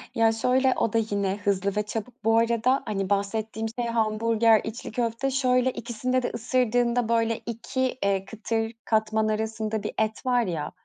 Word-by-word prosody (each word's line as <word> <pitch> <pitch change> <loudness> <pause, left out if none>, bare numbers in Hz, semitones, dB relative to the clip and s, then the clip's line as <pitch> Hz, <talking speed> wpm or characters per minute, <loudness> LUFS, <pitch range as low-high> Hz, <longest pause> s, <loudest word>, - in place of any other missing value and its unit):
Ya, 225 0 +4
şöyle, 255 +3 +2
o 225 - 0
da - - +3
yine 200 -1 0
hızlı 200 -1 0
ve 210 - +1
çabuk 225 +3 -6
bu 225 +1 +4
arada. 235 +3 +2
Hani, 195 -2 -2
bahsettiğim 220 +2 -1
şey 240 - 0
hamburger, 225 0 +3
içli 225 +1 -6
köfte. 235 +3 -1
Şöyle, 255 -1 +2
ikisinde 245 +2 -2
de - - 0
ısırdığında, 240 0 +1
böyle, 230 -1 +2
2 255 +3 -2
eee, 195 -1 +1
kıtır 225 +2 -2
katman 220 0 +1
arasında 220 0 -2
bir 210 - -4
et 220 +2 -1
var 245 -2 +3
ya. 165 -5 -3
225 Hz, 165 wpm, -26 LUFS, 215-240 Hz, -, Ya